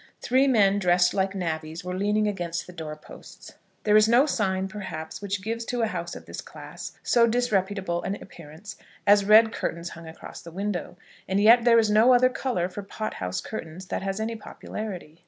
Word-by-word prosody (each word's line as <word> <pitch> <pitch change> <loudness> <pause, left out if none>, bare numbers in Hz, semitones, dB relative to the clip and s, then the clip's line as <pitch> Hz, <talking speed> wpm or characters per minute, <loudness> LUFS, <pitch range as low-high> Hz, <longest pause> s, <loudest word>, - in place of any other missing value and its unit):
Three 260 +3 +2
men 205 -6 +4
dressed 180 -1 +3
like 195 0 0
navvies 160 -1 -4
were 180 0 -4
leaning 210 +2 +1
against 175 -4 -3
the 180 - -12
door 160 -3 -6
posts. 155 - -14 0.3
There 210 0 +3
is 215 +1 +6
no 245 +4 +5
sign, 190 -8 0
perhaps, 190 -5 -7
which 200 -1 -3
gives 230 +2 -3
to 245 -1 -1
a - - +4
house 220 - -4
of - - -10
this - - -7
class - - -9
so 235 -1 +4
disreputable 200 -6 0
an 195 - -3
appearance 170 +2 -11 0.3
as 200 0 +5
red 220 +2 +6
curtains 170 +1 -3
hung 170 -1 -11
across 160 - -10
the 170 - -10
window; 195 +1 -4 0.3
and 190 +1 +1
yet 230 +3 +6
there 235 -1 +6
is 220 -2 +3
no 230 +4 +6
other 255 +1 +5
colour 250 -9 -2
for 185 +2 -7
pot 215 +2 -5
house 90 0 -4
curtains 180 -3 -7
that - - -2
has 195 +1 -3
any 225 +1 -2
popularity. 195 -7 -8
200 Hz, 195 wpm, -26 LUFS, 175-220 Hz, 0.3 s, is